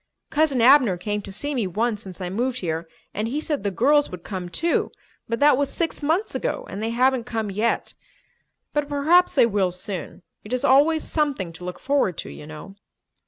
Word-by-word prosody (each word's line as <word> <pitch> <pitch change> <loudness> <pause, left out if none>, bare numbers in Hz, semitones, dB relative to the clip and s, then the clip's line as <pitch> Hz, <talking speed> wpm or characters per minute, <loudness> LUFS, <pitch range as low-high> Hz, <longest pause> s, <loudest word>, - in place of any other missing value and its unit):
Cousin 290 -5 +2
Abner 250 -6 +6
came 205 +3 -3
to 195 - -8
see 285 +9 -3
me 235 -7 0
once 215 +3 -1
since 190 -4 -8
I 180 -1 -4
moved 250 +5 -1
here 165 -1 -3 0.2
and 215 +2 -2
he 275 +6 -2
said 305 -2 -2
the 200 - +1
girls 285 +9 +3
would 180 -2 -9
come, 185 -2 -5
too, 335 - 0 0.4
but 230 - -1
that 290 -2 +5
was 280 0 0
six 330 -2 -2
months 325 +9 0
ago - - -2
and 195 - -5
they 225 - -1
haven't 250 +1 +2
come 225 -4 -3
yet. 215 +4 -1 0.8
But 295 -1 -1
perhaps 315 +6 +3
they 255 -4 +6
will 200 -5 +1
soon. 180 -1 -5 0.2
It 210 - -7
is 255 - 0
always 300 +4 +4
something 275 - -1
to 165 - -11
look 180 0 -5
forward 275 - 0
to, - - -6
you 150 - -10
know." 160 +6 -10
235 Hz, 205 wpm, -23 LUFS, 190-285 Hz, 0.8 s, Abner